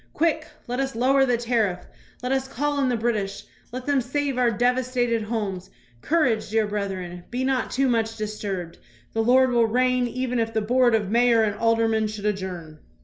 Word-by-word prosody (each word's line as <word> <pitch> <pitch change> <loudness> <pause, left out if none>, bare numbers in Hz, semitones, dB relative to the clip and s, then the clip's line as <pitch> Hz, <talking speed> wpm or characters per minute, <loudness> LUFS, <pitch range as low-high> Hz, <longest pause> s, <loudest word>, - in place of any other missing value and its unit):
Quick, 315 -1 0 0.2
let 245 +2 -3
us 270 -2 -2
lower 270 +3 +3
the 245 -1 +2
tariff. 230 -6 0 0.5
Let 250 - -2
us 265 0 0
call 290 +2 -1
in 270 -2 +2
the 245 - 0
British. 215 -4 -2 0.3
Let 255 +1 -6
them 285 -2 +2
save 275 +2 -2
our 250 -1 +3
devastated 245 0 +1
homes. 205 -4 -3 0.3
Courage, 255 -11 +1
dear 220 0 +2
brethren. 190 -4 -4
Be 250 +2 -2
not 260 -1 0
too 270 +1 +1
much 225 -2 0
disturbed. 200 -5 -5 0.3
The 225 - +1
Lord 255 +3 +4
will 235 -2 +3
reign 250 +2 +2
even 250 0 -2
if 225 0 -1
the 220 - +2
board 240 +2 +3
of 205 -3 -1
mayor 235 -1 +4
and 210 -1 0
aldermen 225 -1 +2
should 210 -1 -6
adjourn. 180 -6 -4
235 Hz, 185 wpm, -24 LUFS, 215-255 Hz, 0.5 s, Lord